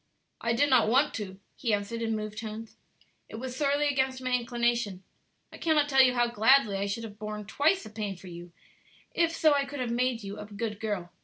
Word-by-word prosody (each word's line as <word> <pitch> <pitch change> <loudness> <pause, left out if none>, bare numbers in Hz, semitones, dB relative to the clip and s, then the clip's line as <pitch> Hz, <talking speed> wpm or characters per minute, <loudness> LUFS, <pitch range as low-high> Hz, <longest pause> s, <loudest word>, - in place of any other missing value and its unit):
"I 235 - +1
did 285 +5 +3
not 245 -4 +5
want 275 +5 +3
to," 190 -3 -7 0.2
he 230 -5 +1
answered 205 +3 -5
in 225 -1 0
moved 215 0 -5
tones; 220 0 -7 0.5
"it - - -8
was 250 +2 -5
sorely 285 +1 +1
against 265 -2 0
my 255 0 -3
inclination, 235 -5 0 0.5
I - - -11
cannot 310 -3 +2
tell 270 -1 +6
you 250 -1 +4
how 240 0 +3
gladly 235 -1 +4
I 200 +1 -1
should 210 +3 -3
have 210 -2 -9
borne 210 -1 -5
twice 310 - +2
the 215 - -10
pain 210 -2 -4
for 185 - -15
you 175 -1 -9 0.6
if 335 -1 +2
so 315 -2 +4
I 280 -1 +1
could 285 0 -7
have 245 -2 -2
made 245 -1 0
you 200 0 -7
a 210 - -6
good 210 0 -4
girl. 200 -6 -3
230 Hz, 220 wpm, -28 LUFS, 210-265 Hz, 0.6 s, tell